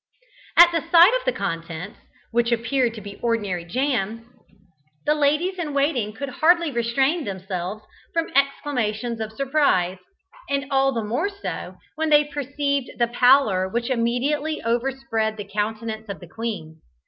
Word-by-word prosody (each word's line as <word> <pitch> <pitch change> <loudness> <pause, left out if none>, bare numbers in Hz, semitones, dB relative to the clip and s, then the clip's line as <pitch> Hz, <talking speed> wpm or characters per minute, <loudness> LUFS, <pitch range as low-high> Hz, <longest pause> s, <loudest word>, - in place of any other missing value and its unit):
At 345 0 +9
the 330 -1 0
sight 345 +5 +8
of - - -1
the - - +3
contents, 165 - -5 0.3
which 235 0 +1
appeared 235 +1 +1
to 215 - -8
be 200 0 -10
ordinary 205 -7 -1
jam, 230 +1 -2 0.7
the 300 - +4
ladies 305 +6 +1
in 300 -4 -3
waiting 275 -7 +1
could 275 +6 -6
hardly 335 +4 +3
restrain 265 +7 +1
themselves 190 0 -5 0.3
from 330 0 -1
exclamations 245 -5 0
of 220 -1 -4
surprise, 220 - +1 0.5
and 280 0 0
all 270 0 +3
the 230 -4 -2
more 240 - -1
so 400 0 -6 0.2
when 320 0 0
they 295 -1 +6
perceived 285 -1 -2
the 235 -1 +2
pallor 240 -7 +4
which 235 +5 -2
immediately 270 +6 0
overspread 230 -2 -1
the 205 - -6
countenance 220 +2 -3
of 195 -5 -5
the 175 - -12
queen. 180 -6 -6
240 Hz, 150 wpm, -23 LUFS, 215-285 Hz, 0.7 s, At